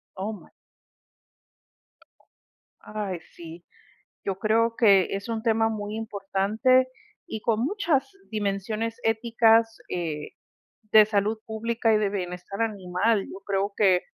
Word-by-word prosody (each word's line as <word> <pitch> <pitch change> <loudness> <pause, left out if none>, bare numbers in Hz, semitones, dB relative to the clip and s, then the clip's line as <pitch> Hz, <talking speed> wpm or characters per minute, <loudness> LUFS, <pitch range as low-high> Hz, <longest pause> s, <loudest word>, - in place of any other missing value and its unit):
Oh, 200 +3 -3
my 210 - -11 2.3
Ay, 205 -4 -4 0.2
sí. 170 0 -10 0.6
Yo 195 -1 -2
creo 230 +2 +2
que 200 -5 +5
es 200 +3 -7
un 225 -1 -2
tema 225 -1 +2
muy 210 -1 -4
importante 220 +4 +1 0.4
y 220 - -5
con 230 0 +1
muchas 330 -6 0 0.2
dimensiones 215 +2 -2
éticas, 225 0 +3
eh, 160 -4 -4 0.6
de 215 -1 +9
salud 215 +1 0
pública 225 +1 0
y 215 - +4
de 210 - +1
bienestar 185 +2 -4
animal. 200 0 0
Yo 195 - -9
creo 200 0 0
que, 185 -4 +4
215 Hz, 120 wpm, -26 LUFS, 195-225 Hz, 2.3 s, de